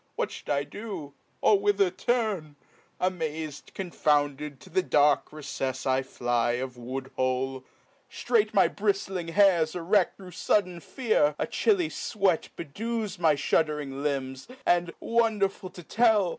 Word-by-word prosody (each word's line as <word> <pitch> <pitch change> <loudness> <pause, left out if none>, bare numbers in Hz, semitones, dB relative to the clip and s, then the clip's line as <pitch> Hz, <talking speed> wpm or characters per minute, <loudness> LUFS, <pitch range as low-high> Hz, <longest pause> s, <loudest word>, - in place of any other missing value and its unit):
What - - -1
fhou'd - - -10
I 140 -1 +1
do? 185 -8 -7 0.3
or 205 - +5
whither 200 -2 +2
turn? 195 -7 -1 0.4
amaz'd, 160 -4 -3
Confounded, 150 -5 0
to 185 - -15
the 185 +3 +2
dark 145 -4 +3
recefs 135 -3 -4
I 130 0 +2
fly 120 -2 0
Of 125 +1 -3
woodhole; 130 +1 -3 0.5
ftrait 445 -3 +1
my - - +5
briftling 195 - -1
hairs 175 -3 +4
erecb 180 +2 +2
Thro' 185 -2 -11
fudden 180 0 0
fear; 215 - +1
a - - 0
chilly 375 -7 +1
fwcat 195 -6 0
bedews 215 +5 -4
My 160 -3 +4
fhud'ring 145 -1 0
limbs, 135 -2 -3 0.2
and 175 -1 +2
(wonderful 210 -5 0
to 180 -1 -12
tell 215 -1 +3
165 Hz, 130 wpm, -27 LUFS, 140-200 Hz, 0.5 s, or